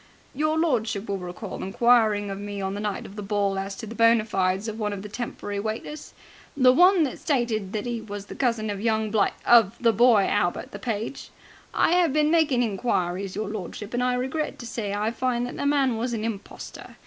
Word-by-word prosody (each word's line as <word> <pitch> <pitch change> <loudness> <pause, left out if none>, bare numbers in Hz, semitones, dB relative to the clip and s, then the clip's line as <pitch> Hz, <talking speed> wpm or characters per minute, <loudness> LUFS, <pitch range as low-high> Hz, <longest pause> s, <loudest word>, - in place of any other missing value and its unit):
"Your 310 +3 0
lordship 225 -10 0
will 200 -1 -2
recall 180 +3 -7
inquiring 215 -1 +3
of 195 - -5
me 205 0 -5
on 190 0 -2
the 205 - -4
night 210 -2 -3
of 195 - -11
the 210 - -5
ball 200 -1 0
as 195 +1 -4
to 225 - -7
the 220 - -8
bona 230 -1 +4
fides 190 0 0
of 220 0 -5
one 210 -1 -1
of 195 -1 -6
the 210 - -7
temporary 205 -3 -5
waiters? 220 +8 -5 0.4
The 255 -2 +6
one 360 +3 +6
that 270 - -3
stated 235 - -1
that 215 0 -2
'e 240 -2 -3
was 205 -2 -7
the - - -9
cousin 230 -5 0
of 200 -1 -5
young 220 -1 0
bli 210 -2 +3 0.2
of 230 -5 +5
the 230 -2 +3
boy 225 -2 +5
Albert, 175 -4 -1
the 200 - -8
page? 225 +3 -4 0.4
I - - +2
have 345 -5 +3
been 305 0 +3
making 300 -7 +3
inquiries, 195 -4 -1
your 210 0 -3
lordship, 210 +1 -6
and 245 - 0
I 250 0 +1
regret 265 +5 -2
to 240 - -9
say 220 -3 -4
I 210 +2 -1
find 245 0 -1
that 245 - -6
the 285 - -1
man 275 -5 +2
was 235 +1 -2
a - - -3
impostor. 220 -3 -7
220 Hz, 220 wpm, -25 LUFS, 205-245 Hz, 0.4 s, The